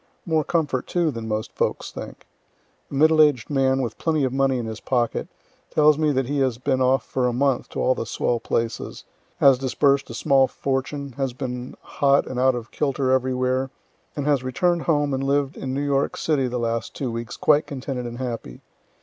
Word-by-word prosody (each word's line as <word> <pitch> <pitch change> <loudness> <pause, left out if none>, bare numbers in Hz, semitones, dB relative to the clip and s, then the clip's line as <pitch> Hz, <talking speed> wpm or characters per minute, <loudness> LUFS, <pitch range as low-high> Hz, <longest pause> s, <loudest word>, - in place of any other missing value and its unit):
More 160 -2 +1
comfort, 150 -6 -1
too, 170 -3 +1
than 115 -3 -6
most 110 0 -3
folks - - -2
think. - - -9 0.6
A - - -11
middle 155 +2 +5
aged 145 -5 +3
man, 135 -1 +2
with 115 -3 -5
plenty 155 -3 +1
of 130 -1 0
money 135 -1 +2
in 120 - -3
his 110 0 -6
pocket, 120 -3 -1 0.4
tells 150 0 +5
me 155 0 +1
that 135 -1 0
he 140 +3 -1
has 130 -4 +1
been 130 +1 0
off 130 -1 +2
for 130 -2 0
a 125 - 0
month 135 +1 0
to - - -6
all 130 - +3
the 115 - -5
swell 120 +1 0
places, 115 0 -3 0.3
has 135 -3 +5
disburs'd 135 +1 +1
a 115 - -6
small 135 +1 +3
fortune, 140 +1 -3
has 135 -3 -1
been 125 -1 -5
hot 140 0 +2
and 125 - -4
out 130 0 +3
of 120 -1 -7
kilter 135 -3 0
everywhere, 130 0 +1 0.5
and 145 - -3
has 145 -3 +2
return' 170 +7 +1
d - - -6
home 145 -3 +1
and 135 0 -1
lived 140 0 0
in 130 - -5
New 140 +2 -1
York 140 -1 0
city 145 -5 +1
the 125 0 -3
last 115 -1 -2
two 130 -4 -3
weeks 115 +1 -5
quite 150 0 +3
contented 130 -3 -4
and 120 0 -7
happy. 115 - -5
135 Hz, 205 wpm, -23 LUFS, 125-140 Hz, 0.6 s, middle